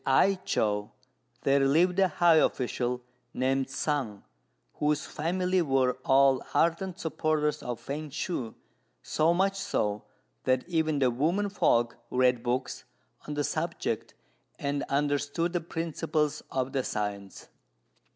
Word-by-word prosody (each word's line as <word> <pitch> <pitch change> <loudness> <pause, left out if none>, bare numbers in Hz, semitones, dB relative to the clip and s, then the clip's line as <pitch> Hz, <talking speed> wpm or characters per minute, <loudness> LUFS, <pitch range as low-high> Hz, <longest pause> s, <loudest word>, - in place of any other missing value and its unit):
At 135 - +1
I 195 - +5
chow 105 -1 0 0.5
there 140 +1 +4
lived 165 +7 +3
a 190 - +5
high 170 -2 +4
official 125 -3 0 0.3
named 135 +1 0
Sung, 135 -8 -2 0.6
whose 150 0 +1
family 180 +3 0
were 135 -4 +2
all 135 -1 +4
ardent 170 +2 +1
supporters 155 -2 0
of 120 -2 -4
Fêng 150 +1 -4
Shui; 135 -6 -3 0.5
so 155 +2 +2
much 195 +3 +2
so, 105 - -1 0.4
that 130 +3 +1
even 160 -3 +1
the 130 -3 +3
women 170 +11 0
folk 120 -10 +2
read 125 -1 +2
books 125 +1 -2 0.4
on 150 - -4
the 145 - 0
subject, 155 +4 -3 0.4
and 140 0 -2
understood 145 +4 0
the 175 - 0
principles 160 -2 -2
of 130 0 -2
the 135 -2 0
science. 100 -3 -4
145 Hz, 130 wpm, -28 LUFS, 130-165 Hz, 0.6 s, I